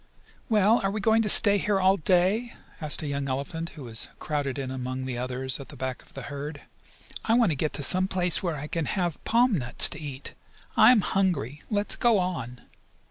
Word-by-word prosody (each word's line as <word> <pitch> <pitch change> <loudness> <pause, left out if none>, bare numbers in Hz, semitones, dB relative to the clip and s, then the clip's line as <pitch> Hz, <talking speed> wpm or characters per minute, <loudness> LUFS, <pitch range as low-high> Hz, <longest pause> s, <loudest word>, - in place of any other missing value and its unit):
"Well, 215 +1 +3
are 195 - +1
we 210 +2 -3
going 220 +2 +3
to 215 - -1
stay 205 0 +7
here 205 -1 0
all 190 +1 +4
day?" 190 +7 +1 0.3
asked 155 +1 +1
a - - -4
young 140 -1 -3
elephant, 160 +6 -4
who 145 - -8
was 115 -3 -4
crowded 145 -3 -3
in 135 -2 -4
among 130 0 -5
the 130 -1 -4
others 130 +1 -2
at 140 - -9
the - - -11
back 130 -1 -5
of - - -23
the 135 - -7
herd. 145 +1 -7 0.6
"I 225 - +2
want 235 -7 +3
to - - -1
get 150 +2 -2
to 145 - -4
some 185 +6 +2
place 180 -2 +1
where 170 -4 -2
I 145 0 -6
can 165 +1 -3
have 175 -3 -3
palm 235 -5 +2
nuts 120 -2 +5
to 150 - -7
eat. 140 -2 -7 0.4
I - - +7
am 235 -4 +4
hungry. 165 - -1
Let's 205 -1 +1
go 235 -3 +3
on!" 145 -10 -4
160 Hz, 215 wpm, -26 LUFS, 135-195 Hz, 0.6 s, stay